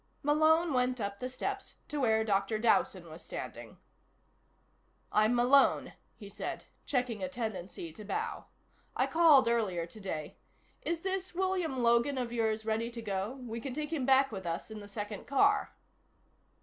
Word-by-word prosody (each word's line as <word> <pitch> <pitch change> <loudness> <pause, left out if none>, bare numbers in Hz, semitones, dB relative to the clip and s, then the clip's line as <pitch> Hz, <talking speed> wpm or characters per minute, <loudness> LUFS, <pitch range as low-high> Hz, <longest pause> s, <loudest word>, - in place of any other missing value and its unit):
Malone 315 +2 +4
went 250 0 +1
up 200 -1 -3
the 255 - -3
steps 255 - -4
to 295 - -3
where 220 -4 +3
Dr. 200 0 +1
Dowson 225 +1 +2
was - - -10
standing. - - -8 1.3
"I'm 215 +3 +3
Malone," 255 +3 +4 0.2
he 205 - -11
said, 200 - -6 0.2
checking 250 -5 -1
a 280 - -2
tendency 200 - -5
to 215 - -10
bow. 435 - -3 0.5
"I - - +2
called 310 -7 +6
earlier 205 -8 +1
today. 170 -5 -6 0.4
Is 335 -1 -2
this 380 -1 -3
William 360 -8 0
Logan 235 +4 +3
of 245 -2 -2
yours 220 -2 0
ready 225 +1 0
to 235 -1 -7
go? 200 +3 -2
We 230 0 -5
can 260 0 -5
take 305 +1 -3
him 275 -5 -1
back 270 0 +5
with 190 -4 -6
us 170 +6 -4
in 215 - -6
the 205 - -10
second 205 0 -6
car." 275 - +3
235 Hz, 160 wpm, -32 LUFS, 215-280 Hz, 1.3 s, called